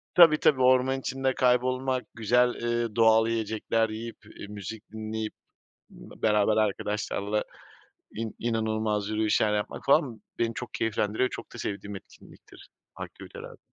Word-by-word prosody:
Tabii 165 -3 +8
tabii 130 -3 +3
orman 130 +1 +4
içinde 135 0 -1
kaybolmak, 130 +1 +1
güzel, 120 +3 +3
eee, 120 -2 -2
doğal 110 0 +5
yiyecekler 115 0 0
yiyip, 115 +1 -6
eee, - - -10
müzik 105 +2 -7
dinleyip, 110 0 -4 0.6
beraber 105 0 0
arkadaşlarla 105 0 -1 0.7
in 110 0 -4
inanılmaz 110 -2 -1
yürüyüşler 110 0 +2
yapmak 105 - -4
falan, 125 -5 +3 0.2
beni 115 -1 0
çok 125 - -7
keyiflendiriyor. 110 +2 0
Çok - - -9
da - - -8
sevdiğim 100 -1 -5
etkinliktir, 95 - -16 0.3
aktivitelerden. - - -9
110 Hz, 120 wpm, -27 LUFS, 105-125 Hz, 0.7 s, Tabii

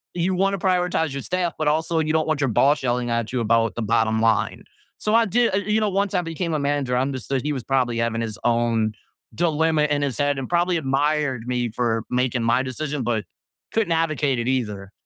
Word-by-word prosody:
you 180 +2 0
wanna 195 +1 +1
prioritize 180 -5 +1
your 140 - -4
staff, 180 -2 -1
but 155 - 0
also, 160 +2 +1
you 155 0 0
don't 160 0 +1
want 155 -2 0
your 135 - +2
boss 140 +6 +3
yelling 120 -1 0
at 115 -1 -1
you 125 - 0
about 115 0 +2
the 120 - -3
bottom 110 0 +1
line. 115 -1 +1 0.4
So, 210 - -1
I 230 0 +5
did 235 +1 +2
uh, - - +3
you 210 +2 0
know, 215 - +1
once 200 +1 0
I 180 - +3
became 165 +1 -3
a - - 0
manager, 140 -3 0
I - - +2
understood 135 -1 -3
he 150 +1 -1
was 130 -4 -4
probably 125 -3 0
having 115 -1 0
his 110 -2 -5
own 115 -2 +1 0.4
dilemma 160 -2 +2
in 145 -1 +1
his 135 -4 -2
head 145 -1 +1
and 130 - -5
probably 175 0 +2
admired 140 -3 0
me 125 -1 -1
for 115 -1 -1
making 125 -1 0
my 120 +3 +2
decision, 140 +2 -3
but 115 -2 -1 0.5
couldn't 220 -6 +1
advocate 155 -5 0
it 120 - -2
either. 105 -7 -2
140 Hz, 220 wpm, -23 LUFS, 120-165 Hz, 0.5 s, I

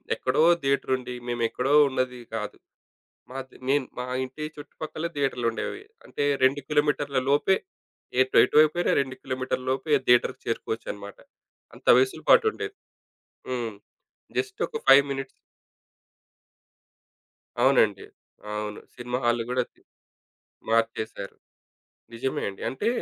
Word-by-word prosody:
ఎక్కడో 130 +4 +1 0.2
థియేటరుండి 130 -2 0
మేమెక్కడో 120 +3 0 0.2
ఉన్నది 130 -1 -2 0.2
కాదు. 105 -2 -4 0.7
మాది 130 0 -8
నేను 140 -2 +2
మా 125 - -2 0.2
ఇంటి 130 +4 -9
చుట్టుపక్కలే 155 +2 -6
థియేటర్లుండేవి. 125 - -1 0.2
అంటే, - - -4 0.2
2 135 +2 +4
కిలోమీటర్ల 145 -2 +1
లోపే. 150 +7 +3 0.6
ఎటు 130 0 +2
ఎటువైపోయినా 155 +6 +4
2 130 -1 -3
కిలోమీటర్ల 130 0 -3
లోపే 140 +3 +2
థియేటర్‌కి 120 0 +3
చేరుకోవచ్చనమాట. 105 -3 -4 0.6
అంత - - -17
వెసులు 395 -1 +1
పాటుండేది. 430 -2 +3 0.7
హ్మ్. 120 -4 -3 0.6
జస్ట్ 405 +1 -3
ఒక 455 - -5
5 140 +1 +8
మినిట్స్. 135 0 -3 2.3
అవునండి. - - +4 0.5
అవును. 105 0 -4 0.2
సినిమా 125 0 -3
హాల్ 120 0 +2
గూడా 125 0 +1
ఉంది. - - -31 0.9
మార్చేశారు. 110 -3 -1 0.8
నిజమే 130 +3 -2
అండి. 95 - -11
అంటే, 135 - -3
130 Hz, 105 wpm, -26 LUFS, 120-145 Hz, 2.3 s, 5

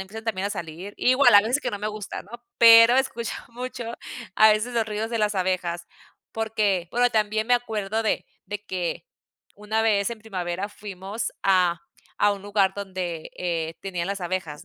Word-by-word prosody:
empiezan 215 +4 -8
también 200 -3 -1
a - - -7
salir 175 +3 -7
Igual, 255 0 +5
hay 205 +1 +8
veces 250 +6 +1
que 250 - -2
no 205 - -4
me 210 - -3
gusta, 210 -2 -6
¿no? 200 - -20 0.3
Pero 230 +1 +9
escucho 235 -4 -1 0.2
mucho 245 0 -6 0.5
a 220 0 +7
veces 215 +3 0
los 230 -1 +2
ruidos 215 +1 -3
de 230 - -1
las 210 -1 +1
abejas, 180 -2 -1 0.5
porque 210 -5 0
Bueno, 245 +1 +3
también 215 0 0
me 245 - +4
acuerdo 220 -2 -2
de 215 - -1 0.2
de 205 +1 -6
que 180 - -3 0.5
una 215 +2 -1
vez 210 -1 +2
en 230 - -6
primavera 190 -2 -4
fuimos 205 +1 -6
a 180 -3 +3 0.4
a 205 0 +4
un 200 -1 -7
lugar 200 -2 +1
donde, 185 -5 -5
eh, 165 -2 -2
tenían 180 -3 -3
las 200 -1 -3
abejas, 175 -4 -4
205 Hz, 180 wpm, -25 LUFS, 185-225 Hz, 0.5 s, Pero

